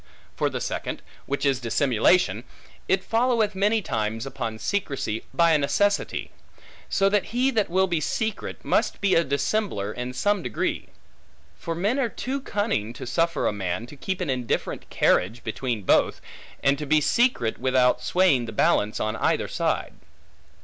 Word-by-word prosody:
For - - +1
the - - -4
second, - - -4 0.2
which 140 +1 -1
is 135 -2 +2
dissimulation; 130 +7 +2 0.4
it 190 0 +2
followeth 230 -2 +1
many 205 +3 +1
times 110 -3 -2
upon 125 -5 -4
secrecy, 135 - -2
by 170 -1 +4
a 155 - +4
necessity; 200 +8 0 0.6
so 195 - +3
that 200 0 +2
he 255 +3 +1
that 215 -5 +1
will 190 +2 +3
be 175 -4 -1
secret, 220 - -3
must - - +1
be 200 -2 +2
a 165 - +4
dissembler 140 - -1
in 125 +1 -5
some 205 +7 +1
degree. 125 -8 -2 0.7
For 165 - -5
men 205 +10 0
are 245 -4 +1
too 270 +5 -4
cunning, 200 - -1
to - - -8
suffer 165 +5 0
a - - +1
man 95 +1 -3
to 130 - -12
keep 190 +6 -4
an 175 - -2
indifferent 125 -3 -2
carriage 110 +7 +1
between 115 -1 -3
both, - - +3 0.4
and 140 0 +3
to 150 - -5
be 155 +2 +4
secret, 150 - +1
without 130 -1 +3
swaying 175 -10 +3
the - - -5
balance 105 0 +2
on 110 0 -1
either - - +1
side. - - -1
150 Hz, 165 wpm, -25 LUFS, 120-200 Hz, 0.7 s, by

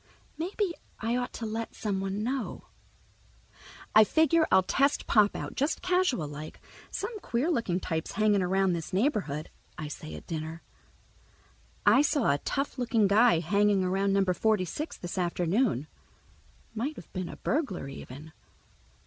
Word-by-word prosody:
Maybe 370 +2 -2 0.3
I 230 +2 0
ought 245 0 -2
to 230 - -5
let 225 +1 -4
someone 195 0 -2
know. 255 +1 -3 1.3
I 215 - +9
figure 320 +6 +3
I'll 190 - +6
test 275 +9 +1
Pop 210 -2 +4
out, - - -5
just 290 +4 -1
casual 360 - +1
like. 150 +2 -8 0.3
"Some 450 -3 -4
queer 275 +1 0
looking 215 - 0
types 160 -3 -3
hanging 210 -1 +3
around 190 0 +2
this 165 0 -5
neighborhood," 185 - 0 0.3
I 155 -3 -5
say 80 - -7
at 75 - -10
dinner. 160 +1 -5 1.2
"I 270 - +7
saw 290 - +2
a 140 - +1
tough 275 -1 -2
looking 230 -3 +2
guy 205 -3 +5
hanging 200 +2 +2
around 195 +2 +1
Number 195 -2 +2
Forty 210 0 +2
six 305 - -5
this 175 +1 -5
afternoon. 175 - +1 0.9
Might 255 +8 -2
have 170 - -12
been 185 -2 -3
a - - -8
burglar, 265 - -1
even." 140 +3 -9
205 Hz, 150 wpm, -29 LUFS, 175-255 Hz, 1.3 s, I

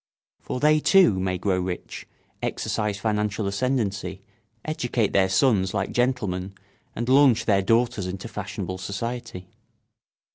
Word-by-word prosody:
For 125 - -5
they 155 +2 +4
too 165 - +5
may 95 -1 -1
grow 95 0 0
rich, 90 -1 -5 0.3
exercise 105 -2 -2
financial 105 0 -1
ascendancy, 100 -1 -2 0.4
educate 120 -8 -1
their 95 -1 +3
sons 95 -2 +2
like - - -1
gentlemen, 105 -7 -1 0.4
and 120 +1 -3
launch 130 -2 +5
their 100 -3 +3
daughters 115 -1 +1
into 95 +4 -6
fashionable 95 -3 -5
society. 100 0 -5
105 Hz, 120 wpm, -24 LUFS, 95-120 Hz, 0.4 s, too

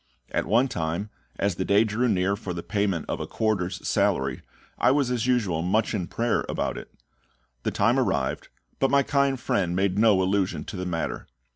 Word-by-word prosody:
At - - -1
one 120 +5 +4
time, 85 +1 -3 0.3
as 100 -1 +1
the 95 - 0
day 100 +3 +4
drew 115 +3 0
near 95 0 +1
for 95 -3 -6
the 85 - -5
payment 100 -5 -1
of - - -3
a - - -4
quarter's 100 -5 -1
salary, 65 -1 +1 0.4
I - - +4
was 135 -2 +2
as 125 0 0
usual 105 -10 +1
much 105 +7 +1
in 95 -5 -2
prayer 115 +6 0
about - - -1
it. - - -9 0.7
The - - -1
time - - +2
arrived, 65 -2 -1 0.3
but 135 - +3
my 140 0 +4
kind 140 -1 +1
friend 90 -6 0
made 95 +1 +1
no 105 -4 +5
allusion 95 0 0
to - - -8
the 90 0 -3
matter. 80 -2 -3
100 Hz, 190 wpm, -26 LUFS, 90-115 Hz, 0.7 s, no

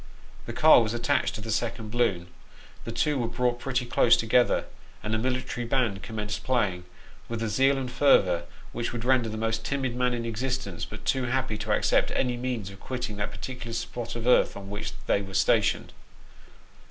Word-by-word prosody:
The - - -3
car 155 -5 +7
was 110 0 -1
attached 120 +3 0
to 110 - -6
the 110 +1 -4
second 110 0 -2
balloon, 115 -8 +1 0.6
the - - -4
two 150 -3 0
were 120 - 0
brought 120 +1 0
pretty 130 -1 -1
close 120 0 +4
together, 120 +2 +2 0.4
and 105 - -2
a 110 - +1
military 125 -1 -2
band 115 -5 0
commenced 105 -2 -4
playing, 105 -9 0 0.4
with 115 -1 -3
a - - 0
zeal 135 +6 +3
and 130 -2 -4
fervour 95 -11 +4 0.3
which 120 0 -3
would 120 -1 -4
render 125 -3 +3
the 110 - -5
most 110 0 -1
timid 130 -3 -2
man 125 -1 +1
in 115 -1 -3
existence 115 -5 -3
but - - -10
too 130 -1 +1
happy 125 -3 -1
to - - -3
accept - - +2
any 125 -2 +1
means 120 -5 -3
of 95 - -13
quitting 125 -4 -5
that 100 0 -2
particular 115 +2 -7
spot 120 0 -4
of 120 -1 -5
earth 125 -4 +4
on 100 0 -9
which 105 - -4
they 100 - +2
were 95 -1 -8
stationed. - - +2
120 Hz, 190 wpm, -27 LUFS, 105-125 Hz, 0.6 s, car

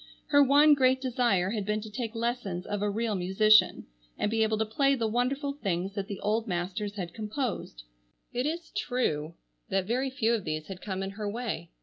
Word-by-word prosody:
Her 285 -1 +6
one 290 +2 +6
great 260 -2 +3
desire 235 -8 +1
had 215 -2 -2
been 210 +2 -1
to 215 - -8
take 230 0 -4
lessons 225 -6 -2
of 205 -1 -3
a 205 - +1
real 220 +2 -1
musician 200 +3 +4 0.3
and 210 - 0
be 225 0 +1
able 220 0 +2
to 220 - +1
play 275 +6 +2
the 230 -4 -1
wonderful 265 +5 0
things 195 -7 -2
that 200 -1 -4
the 200 -3 -5
old 220 +3 0
masters 185 +3 -3
had 175 -4 -5
composed. 215 - -4 0.5
It 250 +3 0
is 330 +1 -4
true 170 - -1 0.3
that 190 -1 +1
very 255 +6 0
few 235 -3 +1
of 225 -4 -1
these 155 -2 -3
had 190 -2 -8
come 195 -2 -3
in 195 - -4
her 205 +1 -4
way. 210 -7 -4
215 Hz, 205 wpm, -29 LUFS, 195-250 Hz, 0.5 s, Her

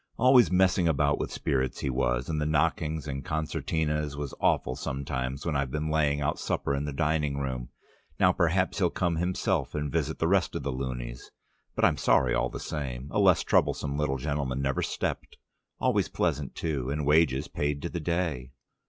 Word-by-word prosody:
"Always 125 0 +6
messing 90 -1 +3
about 70 -2 +2
with - - -3
spirits 65 -2 -1
he - - -1
was, 60 -1 0
and 75 -2 -1
the - - 0
knockings 80 0 0
and 70 -1 -4
concertinas 75 -1 -2
was 70 -2 -4
awful 65 - +2
sometimes 65 -1 -4
when 80 -3 -1
I've 70 -2 0
been 75 +3 -2
laying 75 -2 +2
out 70 - -1
supper 70 - -1
in 70 +1 -1
the 75 - -3
dining 75 -1 0
room. 65 -3 -3 0.5
Now - - +5
perhaps 90 +4 +1
he'll 90 -3 +3
come 85 -2 -1
himself 90 - -1
and 75 -2 -2
visit 80 -1 -1
the 80 - +1
rest 95 0 +2
of - - -3
the 70 - -1
loonies. 60 -2 -5 0.5
But - - +3
I'm - - +3
sorry - - +3
all - - +1
the - - -7
same. 65 -3 -5
A - - 0
less - - +5
troublesome 70 - +1
little 70 -2 0
gentleman 70 -1 -2
never 70 -1 0
stepped. - - -3 0.4
Always - - +2
pleasant, 70 -2 -1
too, 70 -6 -2
and 75 +1 -2
wages 75 -2 +3
paid 75 0 -2
to 85 - -2
the 85 - -4
day." 80 -6 -2
75 Hz, 190 wpm, -28 LUFS, 70-80 Hz, 0.5 s, Always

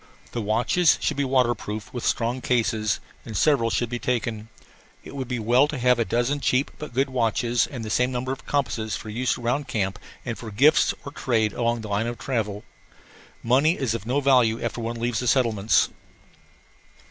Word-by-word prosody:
The 120 - -3
watches 115 - +3
should - - -1
be 140 - +1
waterproof 120 -5 -1
with 120 - -5
strong 120 +2 0
cases, 110 -4 0 0.2
and 110 -4 -5
several 135 -5 +3
should 120 0 -1
be 120 0 -3
taken. 115 -3 -2 0.5
It - - -10
would 130 -2 -4
be 125 -1 -2
well 120 +5 +3
to 150 - -4
have 125 -1 +3
a 115 - +2
dozen 120 +6 0
cheap 135 0 +1
but 150 -5 -8
good 135 +1 +1
watches 120 -1 +1
and 120 -5 -7
the 110 - -5
same 125 +1 +2
number 130 +1 -2
of 135 - -7
compasses 115 -7 -1
for 110 - -7
use 125 +4 -1
around 125 +4 -1
camp 105 -3 -2 0.3
and 115 -3 -4
for 115 - -7
gifts 135 +9 +4
or 140 - -6
trade 110 -7 0
along 120 -1 0
the 110 - -7
line 105 +3 0
of 120 0 -4
travel. 110 -4 -3 0.8
Money 135 +8 +3
is 130 -5 -1
of 115 -1 -5
no 130 +4 +1
value 125 -5 +4
after 120 - -3
one 115 +1 -4
leaves 120 -1 -1
the 125 - -3
settlements. 115 -5 +3
120 Hz, 195 wpm, -24 LUFS, 110-130 Hz, 0.8 s, gifts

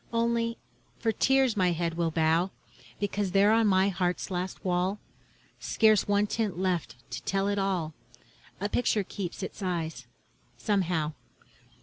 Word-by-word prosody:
Only, 230 0 0 0.4
for 225 - +1
tears 265 0 +3
my 180 -3 +2
head 170 0 -1
will 170 0 0
bow, 160 +3 +2 0.5
Because 205 -2 -1
there 200 +1 +5
on 225 0 +4
my 190 0 +4
heart's 180 0 -1
last 180 +2 -4
wall, 180 +2 +1 0.6
Scarce 215 -3 +3
one 205 0 +3
tint 210 -4 -2
left 180 -7 -1 0.2
to - - -4
tell 195 0 0
it 205 0 0
all, 180 -5 -1 0.7
A 200 - -1
picture 215 -1 +1
keeps 185 0 -5
its 190 - -6
eyes, 165 -8 -3 0.5
somehow. 175 - 0
190 Hz, 140 wpm, -28 LUFS, 175-210 Hz, 0.7 s, there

